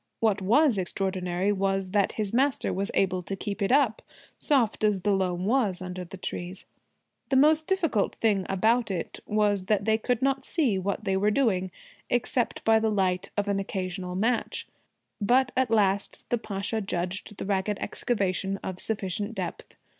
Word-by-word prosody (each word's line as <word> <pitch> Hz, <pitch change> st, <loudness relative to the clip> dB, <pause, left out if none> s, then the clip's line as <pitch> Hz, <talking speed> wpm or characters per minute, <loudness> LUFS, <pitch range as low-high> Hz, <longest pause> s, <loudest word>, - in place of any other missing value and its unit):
What 210 Hz, -3 st, +2 dB
was 235 Hz, +3 st, +4 dB
extraordinary 185 Hz, 0 st, -1 dB
was 195 Hz, -1 st, 0 dB
that 200 Hz, -1 st, +2 dB
his 210 Hz, -2 st, -3 dB
master 270 Hz, +2 st, +1 dB
was 195 Hz, +2 st, -1 dB
able 185 Hz, -1 st, +2 dB
to 195 Hz, +2 st, -4 dB
keep 205 Hz, +2 st, -5 dB
it 200 Hz, -, +1 dB
up, 265 Hz, -5 st, +3 dB, 0.4 s
soft 245 Hz, -8 st, +1 dB
as 210 Hz, -3 st, +2 dB
the 205 Hz, -, +1 dB
loam 180 Hz, -1 st, -1 dB
was 215 Hz, -5 st, +1 dB
under 180 Hz, 0 st, -5 dB
the 185 Hz, +2 st, -10 dB
trees. 180 Hz, +1 st, -5 dB, 0.6 s
The 270 Hz, -, +2 dB
most 310 Hz, +3 st, +4 dB
difficult 330 Hz, -, +1 dB
thing 205 Hz, -4 st, +1 dB
about 220 Hz, +4 st, +2 dB
it 180 Hz, -4 st, -4 dB
was 205 Hz, -2 st, +1 dB
that 200 Hz, -1 st, +1 dB
they 220 Hz, 0 st, +2 dB
could 245 Hz, +2 st, -1 dB
not 270 Hz, 0 st, +1 dB
see 260 Hz, -, +1 dB
what 200 Hz, +3 st, -2 dB
they 195 Hz, -2 st, 0 dB
were 200 Hz, +2 st, +2 dB
doing, 205 Hz, -6 st, +1 dB, 0.4 s
except 245 Hz, 0 st, 0 dB
by 225 Hz, 0 st, +5 dB
the 220 Hz, 0 st, +1 dB
light 185 Hz, -3 st, 0 dB
of 205 Hz, 0 st, 0 dB
an 200 Hz, -1 st, +1 dB
occasional 185 Hz, -2 st, -4 dB
match. 225 Hz, +5 st, -1 dB, 0.5 s
But 250 Hz, +5 st, +3 dB
at 260 Hz, -2 st, +2 dB
last 200 Hz, -3 st, +1 dB
the 240 Hz, -, +3 dB
Pasha 205 Hz, +1 st, -2 dB
judged 190 Hz, +2 st, -3 dB
the -, -, -4 dB
ragged 200 Hz, +1 st, 0 dB
excavation 195 Hz, -4 st, -1 dB
of 185 Hz, -1 st, -5 dB
sufficient 205 Hz, 0 st, -2 dB
depth. -, -, -6 dB
205 Hz, 170 wpm, -27 LUFS, 190-225 Hz, 0.6 s, by